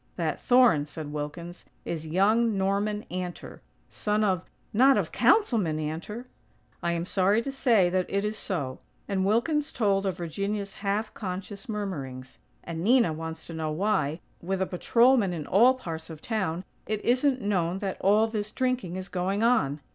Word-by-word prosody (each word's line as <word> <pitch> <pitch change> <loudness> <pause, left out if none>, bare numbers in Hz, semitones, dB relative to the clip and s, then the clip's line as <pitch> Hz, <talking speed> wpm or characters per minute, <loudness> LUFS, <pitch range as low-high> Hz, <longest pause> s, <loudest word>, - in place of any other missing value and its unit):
"That - - -2
thorn," 245 - +4
said 150 0 -7
Wilkins, 160 +4 -6 0.2
"is 160 -2 -4
young 210 +6 +2
Norman 200 +2 0
Antor; 180 -1 -6 0.3
son 210 0 0
of 185 -4 +1 0.2
" - - -38
"Not 270 0 +7
of - - -1
Councilman 220 - +3
Antor?" 165 +10 -5 0.6
"I 170 0 0
am 170 0 -2
sorry 195 +3 +2
to 275 - -3
say 235 -9 +3
that 185 0 0
it 200 +1 0
is 210 +1 -2
so," 145 -12 -3 0.3
and 195 -2 0
Wilkins 290 +8 +1
told 200 -3 +1
of 190 - -2
Virginia's 200 +4 -3
half 205 +2 -1
conscious 195 +1 -6
murmurings. 140 -12 -5 0.2
"And 165 0 -5
Nina 230 -6 +4
wants 160 +1 -6
to 165 - -8
know 160 -1 -2
why, 165 -3 0 0.2
with 190 +2 -2
a 190 - +1
patrolman 230 +2 +3
in 155 -4 -4
all 240 +7 +5
parts 160 -9 -7
of 160 -2 -8
town, 185 -4 -2 0.2
it 215 -1 -3
isn't 255 +2 +3
known 185 -4 0
that 195 -1 -3
all 210 +3 +4
this 215 -2 -3
drinking 250 -7 -1
is 185 0 -5
going 195 +3 -1
on. 150 - +2
195 Hz, 170 wpm, -27 LUFS, 170-215 Hz, 0.6 s, Not